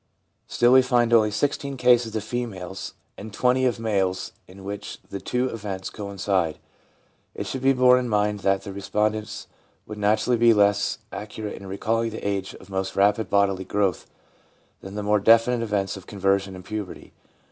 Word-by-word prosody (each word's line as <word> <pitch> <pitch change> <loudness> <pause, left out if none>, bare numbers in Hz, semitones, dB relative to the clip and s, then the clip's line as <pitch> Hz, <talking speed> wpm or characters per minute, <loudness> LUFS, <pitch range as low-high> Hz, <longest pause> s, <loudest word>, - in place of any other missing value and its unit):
Still 120 +1 +3
we 130 - +8
find 120 -2 +2
only 110 -2 +5
16 140 +4 -2
cases 120 -3 +3
of 110 - -2
females 105 -6 -5 0.2
and 110 +2 -8
20 125 +4 +2
of 120 -2 -1
males 95 -4 -1 0.2
in 95 +1 -13
which 100 +1 -6
the 100 - -4
two 125 +1 -1
events 100 -5 -5
coincide. 100 -5 -2 0.8
It - - -4
should 130 - -4
be 135 +1 +4
borne 125 -1 +5
in 125 -1 -3
mind 105 -1 +1
that 95 -1 +1
the 100 - -7
respondents 105 +2 -2 0.4
would 105 -1 -8
naturally 110 +4 +2
be 115 -1 +5
less 100 -1 +2
accurate 105 0 -6
in 100 - -10
recalling 115 +4 -1
the 110 -2 -5
age 100 -1 -3
of 95 - -14
most 95 0 -3
rapid 105 +3 +2
bodily 100 -2 +2
growth 100 0 -1 0.7
than 95 +1 -9
the 105 - -3
more 105 0 +2
definite 115 +3 +4
events 100 -4 -1
of 95 - -11
conversion 95 -1 0
and 90 0 -11
puberty. 105 -3 -7
105 Hz, 170 wpm, -24 LUFS, 100-115 Hz, 0.8 s, we